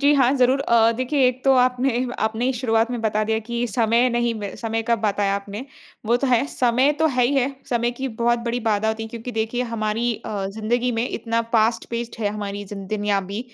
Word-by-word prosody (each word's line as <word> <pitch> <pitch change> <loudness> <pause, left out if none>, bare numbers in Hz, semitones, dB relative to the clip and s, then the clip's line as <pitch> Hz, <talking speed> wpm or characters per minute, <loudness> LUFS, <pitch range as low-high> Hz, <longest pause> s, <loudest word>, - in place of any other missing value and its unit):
जी, 285 +1 +5
हाँ, 265 -1 +4
ज़रूर 255 +1 +3
अ, 230 -4 +4
देखिए 255 +1 +2
एक 255 +1 -1
तो 270 - +5
आपने 250 0 +2
आपने 220 +2 0
ही 265 - +2
शुरुआत 230 -2 +1
में 245 -2 -3
बता 215 -1 0
दिया 220 +1 0
कि 235 0 -1
समय 230 +2 +2
नहीं 240 0 0
ब 200 -1 -5
समय 225 -1 -1
का 235 +1 +1
बताया 205 -2 0
आपने, 200 +4 -5 0.4
वो 235 - +4
तो 275 - -1
है। 250 -1 +3
समय 255 +2 +2
तो 320 - +3
है 250 -4 +2
ही 275 - +1
है, 275 0 +1 0.2
समय 240 -1 +1
की 265 +2 -4
बहुत 235 +1 +1
बड़ी 240 +1 -1
बाधा 220 -1 +1
होती 220 0 -2
है 225 - -6
क्योंकि 235 +2 -7
देखिए 225 +2 -1
हमारी 225 +2 -1
अ, 205 -3 -3
ज़िंदगी 230 +5 -1
में 230 +2 -1
इतना 230 0 -1
फास्ट-पेस्ड 230 +1 0
है 210 - +1
हमारी 205 -1 -5
ज़िं 195 -1 -8
दुनिया 205 -1 0
भी 205 +3 -3
235 Hz, 220 wpm, -22 LUFS, 220-250 Hz, 0.4 s, जी